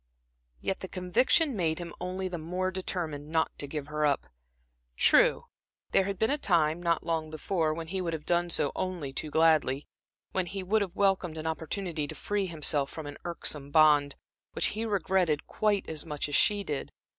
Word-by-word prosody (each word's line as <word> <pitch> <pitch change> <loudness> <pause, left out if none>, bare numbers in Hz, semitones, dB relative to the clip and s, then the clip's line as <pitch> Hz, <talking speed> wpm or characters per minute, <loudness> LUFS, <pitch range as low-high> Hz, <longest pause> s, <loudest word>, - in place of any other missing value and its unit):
Yet 190 - -2
the 190 - -6
conviction 240 - +2
made 160 -5 0
him 170 -1 -6
only 185 +1 -3
the 180 -2 -5
more 180 +4 -2
determined 165 -6 -3
not 160 0 0
to 145 - -3
give 145 0 -4
her 150 +1 -2
up. 145 -2 +2 0.7
True, - - +5 0.5
there 190 - +4
had 200 0 -3
been 220 +6 +2
a 295 - 0
time, 165 - +2
not 170 -1 0
long 160 -2 -1
before, 160 +1 -1
when 165 +1 -4
he 190 +1 -2
would 170 -2 -2
have 155 -2 -5
done 175 0 +1
so 145 -4 +1
only 175 -7 -3
too 155 - -3
gladly; 155 -3 +3 0.5
when 185 -2 -1
he 195 +1 -4
would 210 +4 +2
have 190 -4 -3
welcomed 190 -5 +1
an 155 - -5
opportunity 160 0 -2
to - - -8
free 205 -2 -1
himself 150 -4 0
from 160 - -7
an 145 0 -8
irksome 150 -4 -2
bond, 145 -2 +5 0.4
which - - +3
he 225 +2 -2
regretted 185 -6 +1
quite 210 -2 0
as 155 -2 -2
much 150 -3 -3
as 145 - -7
she 205 +6 +3
did. 145 -7 -4
170 Hz, 190 wpm, -29 LUFS, 155-190 Hz, 0.7 s, True